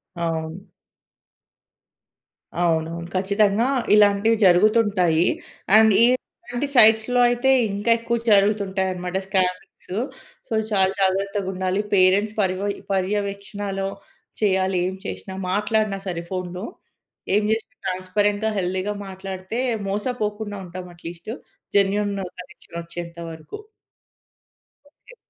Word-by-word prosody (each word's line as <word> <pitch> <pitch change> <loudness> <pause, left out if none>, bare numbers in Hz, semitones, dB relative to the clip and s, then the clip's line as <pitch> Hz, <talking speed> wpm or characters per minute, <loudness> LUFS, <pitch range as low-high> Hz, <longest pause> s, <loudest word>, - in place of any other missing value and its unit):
అవును. 165 +2 -3 2.0
అవునవును. 165 0 0
ఖచ్చితంగా 200 +4 +2 0.3
ఇలాంటివి 210 +2 +5
జరుగుతుంటాయి. 185 -3 +4 0.5
అండ్ 220 0 +7
ఈ - - +8 0.4
ఇలాంటి 245 +4 -3
సైట్స్‌లో 220 +1 +5
అయితే 245 +2 +2 0.2
ఇంకా 205 +4 0
ఎక్కువ 235 +1 -1
జరుగుతుంటాయన్నమాట 190 -3 +1
స్కామింగ్సు. 185 0 -2 0.5
సో, - - -30 0.2
చాలా 190 -2 +3
జాగ్రత్తగుండాలి. 190 0 0
పేరెంట్స్ 200 +3 +4
పర్ 190 -3 +2 0.4
పర్యవేక్షణలో 200 0 -2 0.5
చేయాలి, 190 -2 +2
ఏం 190 - -6
చేసినా. 190 0 -6 0.2
మాట్లాడినా 210 0 0
సరే 170 -2 -3
ఫోన్‌లో. 180 +1 -4 0.7
ఏం 210 - +3
చేసినా 220 0 -2
ట్రాన్స్‌పరెంట్‌గా, 205 +3 0
హెల్తీగా 190 +2 -1
మాట్లాడితే 190 +3 -6 0.3
మోసపోకుండా 210 0 -3
ఉంటాం 180 +1 -8
అట్‌లీస్ట్. 170 +4 -8 0.5
జెన్యూన్ 200 +1 +2 0.3
కనెక్షన్ 175 -2 -11
ఒచ్చేంత 170 0 -8
వరకు. 160 - -9 1.3
ఓకే. - - -19
195 Hz, 95 wpm, -23 LUFS, 185-210 Hz, 2.0 s, ఈ